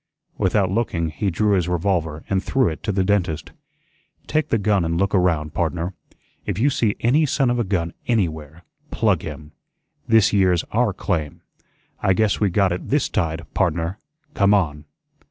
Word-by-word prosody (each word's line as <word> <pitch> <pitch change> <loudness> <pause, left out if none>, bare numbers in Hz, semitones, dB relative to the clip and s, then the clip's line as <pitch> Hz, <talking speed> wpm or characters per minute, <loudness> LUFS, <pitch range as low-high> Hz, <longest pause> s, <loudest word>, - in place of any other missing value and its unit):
Without 95 0 +2
looking, 90 -7 -1
he 100 +6 -2
drew 105 +4 +1
his 90 -3 +1
revolver 85 -3 -1
and 95 0 0
threw 130 -4 +2
it 80 - -7
to 105 - -1
the 95 -1 +1
dentist. 90 -6 -1 0.7
"Take 155 -1 -1
the - - +2
gun 100 -3 +1
an' 85 0 -1
look 100 +2 0
around, 85 -5 +1
pardner. 85 +2 -2 0.5
If - - -3
you 135 +7 +2
see 110 -5 +1
any 145 +6 +3
son 135 -3 +1
of 120 - 0
a - - +2
gun 90 -5 -2
ANYWHERE, 80 - -2 0.3
PLUG - - +1
him. 75 0 -8 0.6
This 110 -3 +4
yere's 90 -4 +3
OUR 115 -1 +2
claim. 80 -6 -3 0.6
I 95 - +3
guess 105 +2 +1
we 105 - +2
got 95 0 +2
it 90 - -4
THIS 145 +2 +1
tide, 80 -4 -2
pardner. 85 +1 -1 0.3
Come 100 +1 +4
on." 75 -6 -1
95 Hz, 170 wpm, -22 LUFS, 85-105 Hz, 0.7 s, This